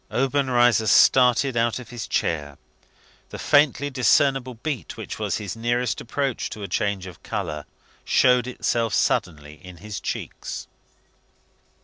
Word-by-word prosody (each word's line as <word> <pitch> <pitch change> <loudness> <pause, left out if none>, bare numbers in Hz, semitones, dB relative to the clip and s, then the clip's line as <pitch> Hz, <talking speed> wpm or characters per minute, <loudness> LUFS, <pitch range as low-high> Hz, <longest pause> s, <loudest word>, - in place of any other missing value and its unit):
Obenreizer 125 -4 +2
started 125 +4 +5
out 115 -1 +1
of 125 -3 -10
his 120 -5 -6
chair. 75 -6 -2 0.7
The - - -8
faintly 145 0 +2
discernible 130 0 +2
beat, 135 +1 -5
which - - -7
was - - -1
his 100 -2 -5
nearest 120 +2 -1
approach 135 +1 -2
to 105 - -8
a - - -4
change 100 0 -1
of 90 -4 -11
colour, 75 -1 -4 0.4
showed 125 -1 +3
itself 115 -2 -1
suddenly 75 -1 -1
in 90 -1 -11
his 105 +2 -7
cheeks. - - -5
120 Hz, 130 wpm, -23 LUFS, 100-130 Hz, 0.7 s, started